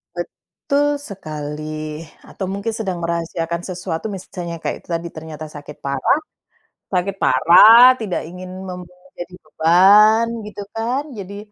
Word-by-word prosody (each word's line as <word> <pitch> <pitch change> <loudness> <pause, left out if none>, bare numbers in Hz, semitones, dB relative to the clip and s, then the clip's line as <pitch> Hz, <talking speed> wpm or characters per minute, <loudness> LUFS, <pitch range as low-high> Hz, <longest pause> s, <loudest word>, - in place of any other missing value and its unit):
Betul 290 0 -2 0.2
sekali 155 -2 -6 0.2
atau 190 - -6
mungkin 200 +3 -3
sedang 195 -5 -3
merahasiakan 170 0 -2
sesuatu. 180 -1 -5
Misalnya 180 -3 -6
kayak - - -4
tadi, 170 0 -2
ternyata 155 -1 -8
sakit 145 0 -11
parah. 140 - +1 0.7
Sakit 190 +1 -1
parah 215 - +8
tidak 200 -5 -3
ingin 180 +2 -9 0.2
membuat 180 0 -10
jadi 175 +1 -8
beban 200 +8 +5 0.2
gitu 205 -1 -8
kan, 245 +6 -1
jadi, 200 0 -8
180 Hz, 120 wpm, -20 LUFS, 160-200 Hz, 0.7 s, parah